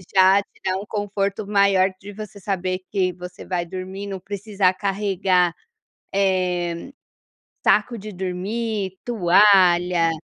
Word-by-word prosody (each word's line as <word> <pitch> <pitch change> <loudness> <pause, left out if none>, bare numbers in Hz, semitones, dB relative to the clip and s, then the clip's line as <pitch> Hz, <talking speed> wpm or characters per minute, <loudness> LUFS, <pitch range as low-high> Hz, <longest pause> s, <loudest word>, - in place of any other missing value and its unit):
já 190 +1 +6
te - - -23
dá 185 0 +1
um 200 - -6
conforto 200 0 -2
maior 200 -2 +3
de 200 +2 -10
você 210 0 -9
saber 185 -1 -2
que 185 -3 +1
você 180 0 -10
vai 175 -2 -2
dormir, 190 +3 -6
não 195 -1 -5
precisar 200 -1 0
carregar, 190 -3 +1 0.6
eh, 180 -2 0 0.8
saco 215 +3 +3
de 210 +1 -8
dormir, 190 +2 -3
toalha, 180 -5 +4
190 Hz, 125 wpm, -22 LUFS, 180-200 Hz, 0.8 s, já